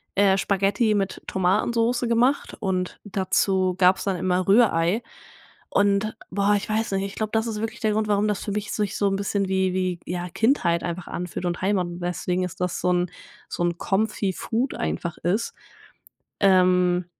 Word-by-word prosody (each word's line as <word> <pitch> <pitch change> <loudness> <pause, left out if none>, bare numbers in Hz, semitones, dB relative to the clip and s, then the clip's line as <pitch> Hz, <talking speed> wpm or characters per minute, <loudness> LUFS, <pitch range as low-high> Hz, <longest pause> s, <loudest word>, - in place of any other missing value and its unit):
äh, 195 -1 +4
Spaghetti 200 +3 +1
mit 195 -2 -2
Tomatensoße 230 +6 +1
gemacht 245 +4 +1
und 185 -1 -2
dazu 190 -1 +1
gab 185 0 +5
es - - -5
dann 195 -2 -1
immer 180 +1 0
Rührei 195 -2 +4 0.7
und, 205 +2 +1 0.2
boah, 200 +2 +2
ich 205 +1 -2
weiß 220 0 0
nicht, 195 0 0
ich 200 - -7
glaube, 215 -1 -3
das 220 +1 +1
ist 215 -2 -3
wirklich 225 - -4
der 220 - +2
Grund, 215 0 0
warum 205 +1 +2
das 210 -2 -1
für 205 - -4
mich 205 0 -3
sich 205 -2 -2
so 205 - +2
'n 195 - 0
bisschen 200 0 -1
wie 190 -1 +1
wie 185 -2 -1
ja 175 +1 -3
Kindheit 190 - +1
einfach 175 0 -4
anfühlt 180 +1 -5
und 175 0 -2
Heimat 190 -1 +1
und 175 0 -7
deswegen 180 +1 -2
ist 180 - -6
das 180 -1 -1
so 180 - +2
'n 180 0 +1 0.4
so - - -2
'n 175 0 0
Comfy-Food 215 +5 -1
einfach 170 -2 -3
ist. 195 +7 -1 0.9
Ähm 180 -2 +4
195 Hz, 180 wpm, -24 LUFS, 180-210 Hz, 0.9 s, gab